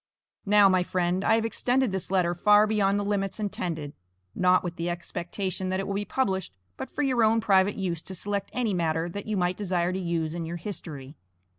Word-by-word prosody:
Now, 205 0 +6
my 185 -1 +3
friend, 180 +1 0
I 225 - +4
have 225 0 0
extended 250 +1 +1
this 190 -1 -4
letter 180 -2 +2
far 210 +4 +5
beyond 205 -2 +2
the 205 - -2
limits 200 0 -1
intended, 165 -8 -3 0.4
not 185 0 +3
with 175 -1 -4
the 170 0 -2
expectation 175 +2 -4
that 185 0 -1
it 195 - -2
will 200 - -3
be 205 +1 -2
published, 190 - -1 0.2
but - - -6
for 295 - -2
your 255 -4 +2
own 220 +1 +4
private 195 -2 +3
use 175 -5 -2
to 190 - -7
select 200 +2 -2
any 235 -5 -1
matter 165 -1 0
that 200 +4 -7
you 215 -2 -1
might 180 0 0
desire 180 -3 0
to 190 - -2
use 170 -3 -2
in 170 0 -4
your 165 +1 -4
history. 155 -7 -7
190 Hz, 210 wpm, -27 LUFS, 175-205 Hz, 0.4 s, Now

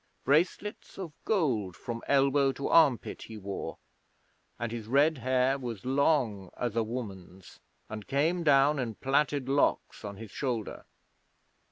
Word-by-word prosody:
Bracelets 170 +8 0
of 180 -6 -6
gold 120 - 0
from 115 -1 -6
elbow 140 0 +3
to 140 - -4
armpit 145 -8 +3
he 110 - -9
wore, 100 -1 -5 0.8
and 120 -1 -3
his 115 -2 -6
red 140 +4 +3
hair 130 +2 +1
was 120 -6 -6
long 130 - +1
as 120 -3 -2
a 115 - +3
woman's, 95 -6 -7 0.3
and 110 -1 -7
came 155 +6 +1
down 145 -1 +4
in 115 -4 -3
plaited 140 +1 0
locks 140 -3 +1
on 100 -1 -6
his 110 -2 -9
shoulder. 120 -6 -3
130 Hz, 140 wpm, -29 LUFS, 110-140 Hz, 0.8 s, down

